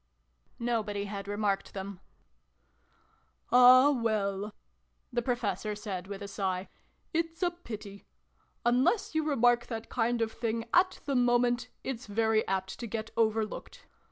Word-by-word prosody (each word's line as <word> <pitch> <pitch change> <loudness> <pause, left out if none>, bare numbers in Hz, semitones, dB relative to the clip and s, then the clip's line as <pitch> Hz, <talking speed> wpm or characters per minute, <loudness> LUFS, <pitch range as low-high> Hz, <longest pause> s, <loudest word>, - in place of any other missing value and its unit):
Nobody 215 -4 -1
had 200 -1 -6
remarked 205 -1 -1
them. 195 -1 -6 0.7
" - - -38
Ah, 255 +3 +8
well! 210 -5 -1 0.3
" - - -41
the 240 - +1
Professor 215 -4 -1
said 195 -4 -5
with 200 0 -6
a - - -5
sigh. 190 -2 -2 0.4
"It's 330 +1 -1
a 350 - +2
pity. 215 - -9 0.6
Unless 250 - +2
you 315 0 +1
remark 245 -5 +3
that 225 -2 -5
kind 235 -1 +1
of 220 - -2
thing 230 0 -2
at 370 +1 +3
the 280 - -1
moment, 245 -1 +2
it's 255 -2 -5
very 220 +1 +1
apt 190 0 -2
to 235 - -4
get 225 +1 -4
over 220 -1 +2
looked - - -10
225 Hz, 145 wpm, -30 LUFS, 205-245 Hz, 0.7 s, Ah